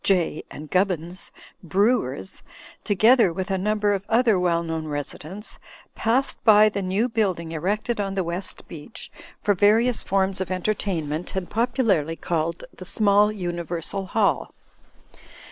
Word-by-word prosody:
Jay 175 -5 +1
and 150 -1 -10
Gubbins, 180 -1 -1 0.3
brewers, 185 - 0 0.4
to 205 - +1
gether 225 -1 +5
with 185 +3 -4
a 190 - +1
number 210 +1 +1
of 195 -1 -2
other 225 -4 +3
well 170 -2 +1
known 160 -1 -4
residents, 155 +7 -6 0.3
passed 255 +4 0
by 215 -1 +7
the 200 -1 -3
new 195 +5 0
building 190 -8 -1
erected 205 +8 -1
on 195 -1 -3
the 190 - 0
West 175 +3 -4
Beach 165 +7 -10 0.3
for 205 - +3
various 220 +5 +3
forms 190 0 0
of 190 - -3
entertainment 180 -5 -2
and 190 -2 -2
popularly 225 - +1
called 165 0 -2
the - - -10
small 205 +2 +3
Universal 175 0 -4
Hall. 210 -3 +1
190 Hz, 140 wpm, -24 LUFS, 170-210 Hz, 0.4 s, by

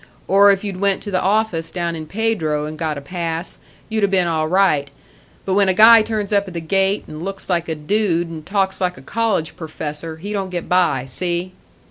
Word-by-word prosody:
Or 200 +1 +6
if 195 0 0
you'd 195 -3 -4
went 200 -1 +1
to 205 - -5
the 185 - +1
office 195 -5 0
down 170 -2 -3
in 155 -1 -7
Pedro 175 -8 -1
and 155 +1 -6
got 155 -1 -3
a - - -6
pass, 170 +2 -4 0.3
you'd 220 -1 -1
'a - - +5
been 190 -2 +2
all 160 -2 0
right. 160 -6 +2 0.6
But 190 - 0
when 200 0 +4
a 185 - +1
guy 225 +2 +8
turns 215 -2 -2
up 200 -1 +2
at 180 - -9
the - - -1
gate, 195 +4 +1
and 155 +2 -8
looks 195 0 -5
like 170 -1 0
a 160 - -1
dude 175 +1 0
and 160 -2 -8
talks 195 +1 -1
like 180 -1 0
a - - -13
college 225 -8 -1
perfessor, 160 0 -6
he 200 +6 -6
don't 195 -2 -2
get 175 -2 -4
by, 175 -8 +2
see?" 175 +6 -2
180 Hz, 220 wpm, -20 LUFS, 160-200 Hz, 0.6 s, guy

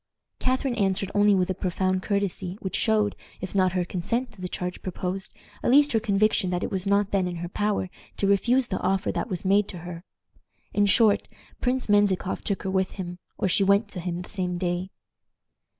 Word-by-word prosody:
"Catharine 260 0 0
answered 195 -3 0
only 205 0 +5
with 185 0 +1
a - - +1
profound 185 +1 0
courtesy, 195 -2 -1
which 190 - -4
showed, 215 -2 +2 0.2
if 185 - -6
not 185 -2 +3
her 180 -1 0
consent 230 +9 -2
to 210 - -15
the 180 - -3
change 180 0 -4
proposed, 185 +1 -4 0.3
at - - 0
least 290 +3 +6
her 225 - +3
conviction 215 -2 +2
that 180 0 -1
it - - -3
was 190 0 -2
not 200 0 +2
then 190 -2 +1
in 175 - -4
her 175 +1 -4
power 205 +1 -1 0.3
to - - 0
refuse 240 +6 +3
the - - -1
offer 190 +1 +1
that - - -3
was 185 -1 -4
made 200 +1 +4
to 185 - -7
her. 175 -1 -7 0.7
In 205 0 +3
short, 210 +1 +4 0.3
Prince 255 0 0
Menzikoff 205 -3 +2
took 200 - -2
her 190 - -2
with 190 0 0
him, 180 -2 -6 0.2
or - - +1
she 190 +2 +3
went 200 +2 +3
to 185 - -6
him 175 0 -3
the - - -13
same 180 -3 -2
day." 175 +1 -2
195 Hz, 205 wpm, -26 LUFS, 180-205 Hz, 0.7 s, least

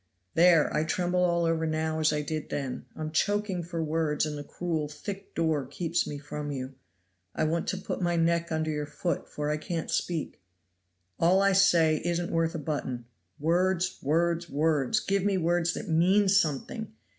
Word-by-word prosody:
There, 170 -2 +5
I 150 - +2
tremble 180 +2 0
all 170 -1 +2
over 165 -1 +1
now 155 0 -1
as 155 0 +3
I 150 -1 -1
did 155 +1 -4
then. 135 -3 -4
I'm 155 0 -4
choking 205 +2 0
for 170 -1 -3
words, 155 -1 0
and 150 -1 -4
the 145 - -6
cruel, 160 -1 -3
thick 195 +7 -8
door 160 -4 +1
keeps 170 +3 -1
me 145 - -4
from 150 0 -6
you. 130 -1 -4 0.6
I - - 0
want 165 +2 0
to 190 - -1
put 190 - -4
my 175 -1 +1
neck 170 0 +1
under 155 0 0
your 150 -1 -3
foot, 170 +3 -3
for 150 0 -2
I 150 - 0
can't 165 +1 -4
speak. 165 - -2 0.8
All 180 +3 +4
I 195 0 +4
say 170 -5 +5
isn't 175 0 -1
worth 165 0 +1
a - - -1
button. 140 -5 -3 0.3
Words! 180 +3 +1
words! 170 +3 +1
words! 150 - +2
give 195 -2 0
me 200 -1 +2
words 175 0 +1
that 220 - -5
mean 185 +5 +4
something. 195 - +1
165 Hz, 180 wpm, -28 LUFS, 155-175 Hz, 0.8 s, There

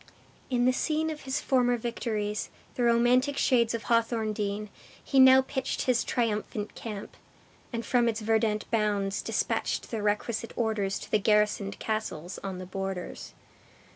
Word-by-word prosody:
In 245 -2 +2
the 255 - +5
scene 315 +4 0
of 300 -2 -8
his 265 0 -1
former 245 -2 +2
victories, 215 -3 -3 0.2
the - - -4
romantic 245 +4 +3
shades 235 -2 +3
of 230 - -5
Hawthorndean, 215 -3 0 0.3
he 270 - +2
now 260 0 +8
pitched 265 0 -2
his 250 -2 +2
triumphant 215 -3 -2
camp; 210 -3 -7 0.6
and 235 -1 -4
from 240 -2 +3
its 225 -1 -3
verdant 220 -1 +1
bounds 205 -3 0
dispatched - - -1
the 225 -2 -2
requisite 215 +2 -1
orders 215 -4 0
to - - -10
the 215 - +4
garrisoned 210 -1 +2
castles 215 -5 -3
on 190 -2 -4
the 185 - -6
borders. 190 -1 -5
225 Hz, 145 wpm, -28 LUFS, 210-245 Hz, 0.6 s, now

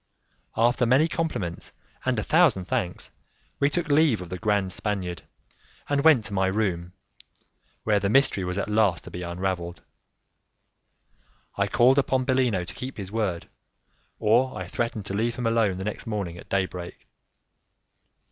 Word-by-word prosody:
After 120 +1 +3
many 135 +7 +4
compliments 155 - -3 0.3
and 130 -2 +1
a 110 - 0
thousand 155 - +3
thanks, 90 -1 -3 0.5
we 140 - +3
took 170 +1 -1
leave 145 -5 +4
of 90 -2 -8
the 90 0 -5
grand 100 -4 0
Spaniard, 95 -6 -3 0.7
and 140 -1 +1
went 150 -9 +6
to 100 - -6
my 95 -1 +2
room, 90 -4 -1 0.9
where 105 -2 +2
the 100 0 0
mystery 120 -5 +3
was 90 +1 -3
at 100 - -1
last 105 -5 +2
to - - -10
be 90 - -6
unravelled. 85 0 -3 1.7
I - - +1
called 130 +3 +4
upon 130 -1 +1
Bellino 125 -9 +1
to - - -9
keep 130 +1 -7
his 100 -2 -6
word, 100 -6 -2 0.7
or 120 +5 +2
I - - -4
threatened 115 -3 -3
to 100 - -5
leave 115 +3 0
him 125 -1 -4
alone 115 -5 +2
the 95 - -4
next 105 - -4
morning 100 -6 -3
at - - -14
day 95 -1 +2
break. 90 -1 -9
105 Hz, 160 wpm, -26 LUFS, 95-125 Hz, 1.7 s, went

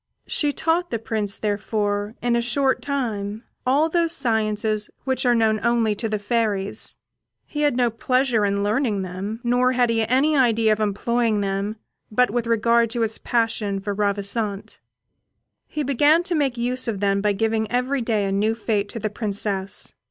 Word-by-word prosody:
She 295 -2 +1
taught 335 +4 0
the 230 - -1
Prince, 215 -2 -2
therefore, 205 0 -1
in 240 -1 +2
a 235 - +2
short 265 +3 +1
time, 220 -6 -3 0.2
all 285 +5 +4
those 335 0 +1
sciences 215 -4 0
which 260 -1 0
are 240 - +4
known 220 -1 +2
only 235 -2 +2
to 220 +2 -3
the 215 - 0
fairies. 205 -2 -1 0.5
He 295 - -4
had 290 -4 +2
no 245 -2 +2
pleasure 250 0 +1
in 200 0 +1
learning 210 -2 0
them, 195 +5 -5
nor 250 +1 +2
had 245 -2 +2
he 225 -1 +1
any 275 +6 +3
idea 230 -5 +3
of 215 - -4
employing 215 +1 0
them 200 +2 -2 0.4
but 250 +1 +3
with 240 0 -1
regard 230 0 +3
to 235 +1 -2
his 220 -1 -1
passion 225 -4 0
for 200 +1 -3
Ravissante. 200 0 -2 0.9
He 300 - -3
began 290 +5 +3
to 360 0 -3
make 280 -6 0
use 250 +2 -1
of 215 -4 -2
them 200 0 +1
by 210 0 +2
giving 220 +1 0
every 250 +2 0
day 220 -3 0
a 195 - -1
new 210 +3 +1
fête 210 -3 -1
to 230 - -5
the 215 -1 -2
Princess. 205 -2 -2
225 Hz, 175 wpm, -23 LUFS, 205-250 Hz, 0.9 s, all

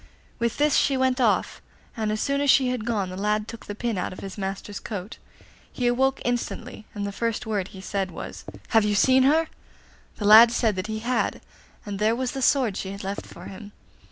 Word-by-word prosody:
With 235 0 -1
this 295 0 +3
she 275 -1 +2
went 260 0 +1
off, 225 -4 +1 0.3
and 220 -2 -1
as 215 - -2
soon 280 +3 0
as 285 - +1
she 260 -1 +5
had 250 -4 -3
gone 205 -6 -1
the - - -6
lad 210 +2 0
took 230 -1 -10
the 205 - -5
pin 225 -3 -2
out - - -2
of 185 - -9
his 195 -1 -7
master's 195 +1 -5
coat. 205 -1 -7 0.5
He 250 - -3
awoke 265 +3 +2
instantly, 245 -1 -3
and 205 -1 -3
the 200 - -3
first 230 +3 -2
word 205 -4 -1
he 190 - -11
said 195 0 -2
was, - - -8 0.3
'Have 225 -2 +4
you 210 0 +1
seen 260 +5 +5
her?' 305 +5 +4 0.7
The 210 - -4
lad 220 +3 +9
said 225 -3 +1
that 185 - -3
he 220 0 -4
had, 250 +1 0 0.5
and 200 -2 -5
there 215 +2 +2
was 255 0 -2
the 270 - -5
sword 250 -6 +2
she 190 - -4
had 200 - -8
left 195 +1 -5
for - - -12
him. 205 +2 -10
220 Hz, 220 wpm, -25 LUFS, 205-250 Hz, 0.7 s, lad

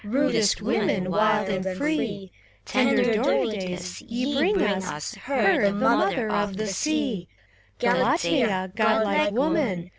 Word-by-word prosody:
Rudest 230 -3 +1
women, 200 -5 0
wild 210 +1 +2
and 190 -1 -3
free; 215 -10 -2 0.3
Tender 245 -2 +2
Dorides, 190 -7 -2
ye 250 +4 -3
bring 370 +8 +2
us 190 - -2
Her, 245 -7 +1
the 200 -1 +2
Mother 205 +2 +1
of 205 -2 -1
the 215 - -2
Sea, 245 - -2 0.3
— - - -34
Galatea, 195 -8 +1
godlike 220 +3 +2
woman. 245 - -1
215 Hz, 120 wpm, -24 LUFS, 195-255 Hz, 0.3 s, wild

